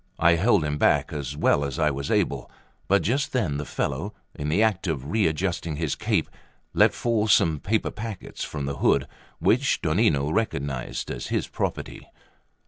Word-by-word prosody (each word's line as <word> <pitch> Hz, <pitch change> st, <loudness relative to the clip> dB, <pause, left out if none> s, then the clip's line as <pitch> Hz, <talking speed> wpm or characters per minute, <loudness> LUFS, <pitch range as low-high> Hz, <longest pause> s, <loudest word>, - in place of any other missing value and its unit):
I 85 Hz, 0 st, +5 dB
held 95 Hz, +1 st, +3 dB
him 75 Hz, 0 st, -2 dB
back -, -, +3 dB
as 70 Hz, -1 st, -4 dB
well 70 Hz, -, +3 dB
as 70 Hz, -2 st, -3 dB
I 75 Hz, -2 st, +2 dB
was 70 Hz, 0 st, -4 dB
able; -, -, 0 dB, 0.4 s
but 100 Hz, +1 st, +3 dB
just 135 Hz, +5 st, 0 dB
then 95 Hz, -, 0 dB
the 75 Hz, -, -4 dB
fellow, 100 Hz, +10 st, -3 dB, 0.2 s
in 75 Hz, 0 st, -4 dB
the 95 Hz, +8 st, +3 dB
act 100 Hz, -4 st, +1 dB
of 75 Hz, -2 st, -3 dB
readjusting 85 Hz, -4 st, 0 dB
his 80 Hz, -2 st, -1 dB
cape, -, -, 0 dB, 0.5 s
let -, -, +4 dB
fall 115 Hz, -3 st, +1 dB
some 80 Hz, -6 st, +4 dB
paper 110 Hz, +6 st, 0 dB
packets 110 Hz, -3 st, -6 dB
from 70 Hz, -2 st, -4 dB
the 70 Hz, 0 st, -3 dB
hood, -, -, +3 dB, 0.3 s
which -, -, +2 dB
Donnino 70 Hz, +1 st, +2 dB
recognised 70 Hz, -, -2 dB
as -, -, -5 dB
his -, -, -1 dB
property. -, -, -4 dB
80 Hz, 170 wpm, -25 LUFS, 70-105 Hz, 0.5 s, I